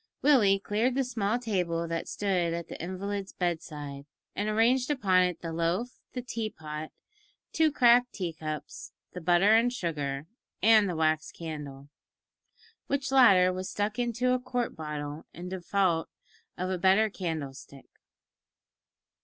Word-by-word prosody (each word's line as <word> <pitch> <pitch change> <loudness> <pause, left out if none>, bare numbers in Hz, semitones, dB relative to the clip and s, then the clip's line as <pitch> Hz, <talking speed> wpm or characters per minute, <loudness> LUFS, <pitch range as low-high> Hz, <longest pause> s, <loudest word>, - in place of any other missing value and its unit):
Willie 235 -9 +5
cleared 215 +5 0
the 270 - +2
small 230 -3 -1
table 180 -8 -1
that 165 0 -3
stood 180 -4 0
at 170 0 -6
the - - -7
invalid's 195 +2 -4
bed 175 -3 -1
side, 145 -2 -8 0.3
and 205 +1 -1
arranged 240 +5 +2
upon 195 -11 +3
it 180 -2 0
the 165 -1 -4
loaf, 175 +9 -1
the 250 - -4
tea 225 -2 -3
pot, 155 -3 -7 0.6
two 320 -1 +3
cracked 245 -2 +5
tea 175 -4 -4
cups, 155 -1 -7 0.2
the 180 - -6
butter 175 +5 +4
and 230 +2 +4
sugar, 150 - -3 0.3
and 215 -1 +5
the 175 - -2
wax 155 -1 +1
candle 145 -4 -7 1.0
which 280 -1 -1
latter 195 -9 +6
was 185 0 -4
stuck 205 +2 -2
into 245 +1 0
a 255 - +1
quart 250 -1 -3
bottle 150 -1 -6
in 180 +2 -7
default 185 -2 0 0.5
of 185 +1 -2
a 185 - -2
better 190 +5 +4
candle 160 -9 -4
stick. 135 0 -13
185 Hz, 150 wpm, -29 LUFS, 165-225 Hz, 1.0 s, latter